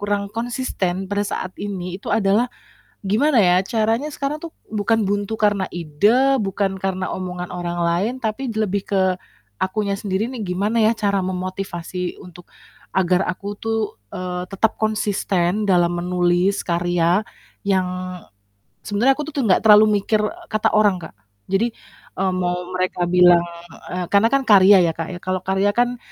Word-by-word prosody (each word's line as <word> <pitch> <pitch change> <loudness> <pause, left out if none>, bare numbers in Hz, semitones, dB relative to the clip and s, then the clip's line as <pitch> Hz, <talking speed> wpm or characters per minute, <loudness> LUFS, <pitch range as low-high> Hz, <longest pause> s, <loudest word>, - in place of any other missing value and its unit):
kurang 205 0 -1
konsisten 225 -6 -2
pada 205 +1 -2
saat 185 0 -4
ini 185 -2 -5
itu - - -8
adalah, 210 +4 +2 0.6
gimana 250 +8 +2
ya 180 - +4
caranya 225 +7 0
sekarang 290 +1 -4
tuh 335 - -6 0.2
bukan 220 +1 0
buntu 205 +2 -1
karena 205 -3 +2
ide, 210 - +2
bukan 195 -1 -2
karena 190 -1 -2
omongan 180 -1 -5
orang 175 -1 -4
lain 185 +8 0
tapi 240 +2 -3
lebih 210 -3 -1
ke 195 -2 +2 0.6
akunya 200 +1 -1
sendiri 195 +1 -2
nih 245 - -5
gimana 205 +5 0
ya 220 - +5
cara 200 -2 +1
memotivasi 185 -1 -4
untuk 175 -1 -14 0.5
agar 185 -1 +3
aku 185 +2 -5
tuh, 225 0 -1 0.4
eee, 180 0 -4
tetap 215 +3 0
konsisten 205 -3 0
dalam 175 -2 +3
menulis 180 +2 +1
karya 175 +1 +1 0.5
yang 190 -2 +2 1.0
sebenarnya 225 +6 +3
aku 300 - -3
tuh 280 - -1
nggak 185 - +4
terlalu 210 0 +8 0.2
mikir, 215 - +2
eee, 345 +9 -5
kata 215 -1 +2
orang 205 -3 +4
Kak, 160 - -9 0.3
jadi, 195 +5 +1 0.5
eee, 190 0 +1
mau 180 0 -2
mereka 185 -1 0
bilang 175 -1 +6 0.5
eee, 180 0 -2
karena 200 +3 +5
kan 275 - +4
karya 200 -1 +8
ya 165 - +1
Kak 165 - -3
ya, 175 - -7
kalau 185 0 -2
karya 195 +1 +2
kan, 245 0 +2
195 Hz, 155 wpm, -21 LUFS, 180-215 Hz, 1.0 s, terlalu